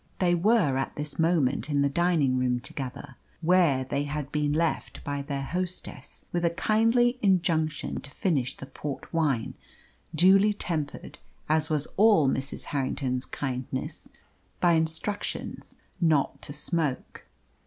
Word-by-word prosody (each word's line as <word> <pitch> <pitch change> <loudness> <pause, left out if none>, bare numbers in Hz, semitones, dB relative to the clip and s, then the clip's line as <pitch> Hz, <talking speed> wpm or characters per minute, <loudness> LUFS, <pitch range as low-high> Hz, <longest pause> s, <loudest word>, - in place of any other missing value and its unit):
They 175 -2 +2
were 175 - +3
at 135 - -2
this 150 +1 -4
moment 155 -6 +2
in 145 -1 +2
the - - +3
dining 145 -4 +2
room 125 -1 +1
together, 130 +1 -7 0.2
where 165 -6 +4
they 140 +2 -2
had 145 -1 -4
been 150 -1 0
left 160 +2 -1
by 145 -2 -3
their 140 -1 -3
hostess 180 +4 -5
with 175 0 -1
a 170 - +4
kindly 230 +7 +2
injunction 165 -6 +1
to 145 - -10
finish 140 - -1
the - - -8
port 140 +1 -7
wine, 145 -9 +1 0.6
duly 195 +5 +5
tempered 155 -8 -4 0.3
as 155 0 +2
was 150 -2 0
all 205 -8 +6
Mrs. 135 +1 -2
Harrington's 130 -2 -1
kindness 130 -1 -4 0.5
by 175 -1 +4
instructions 160 +6 -2 0.2
not 155 -4 +2
to - - -7
smoke. 150 -2 -2
150 Hz, 135 wpm, -27 LUFS, 140-175 Hz, 0.6 s, all